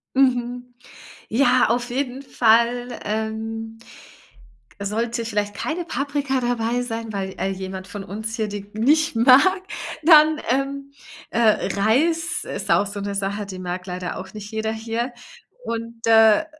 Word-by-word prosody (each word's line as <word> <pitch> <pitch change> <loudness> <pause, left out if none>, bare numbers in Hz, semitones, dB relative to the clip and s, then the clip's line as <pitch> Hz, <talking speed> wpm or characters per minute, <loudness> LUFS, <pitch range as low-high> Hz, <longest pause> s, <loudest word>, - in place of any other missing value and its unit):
Mhm. 245 -1 +1 0.6
Ja, 255 +1 +4
auf 240 +1 0
jeden 260 +1 -3
Fall, 240 0 +2
ähm, 220 +1 -4 1.0
k 200 - -5
sollte 230 +2 -2
vielleicht 205 -2 -2
keine 335 +2 -3
Paprika 280 -2 -1
dabei 240 0 0
sein, 230 -2 -4
weil, 190 -1 -4
äh, 195 - -1
jemand 190 0 -6
von 205 +1 -7
uns 220 +4 -5
hier 220 -3 -1
die 205 0 -7
nicht 290 +7 +2
mag, 275 +11 +5 0.4
dann, 310 -1 +7
ähm, 275 +2 -1 0.4
äh, 220 -4 +2
Reis 320 +11 +1
ist - - -5
auch 200 - +4
so 200 0 -6
'ne 200 0 -3
Sache, 200 +1 -2
die 190 -2 -8
mag 180 0 -4
leider 180 0 -4
auch 190 0 -8
nicht 210 0 -8
jeder 220 0 -2
hier. 230 +3 -3 0.5
Und, 230 0 -5
äh, 225 +6 +6
230 Hz, 145 wpm, -22 LUFS, 210-255 Hz, 1.0 s, dann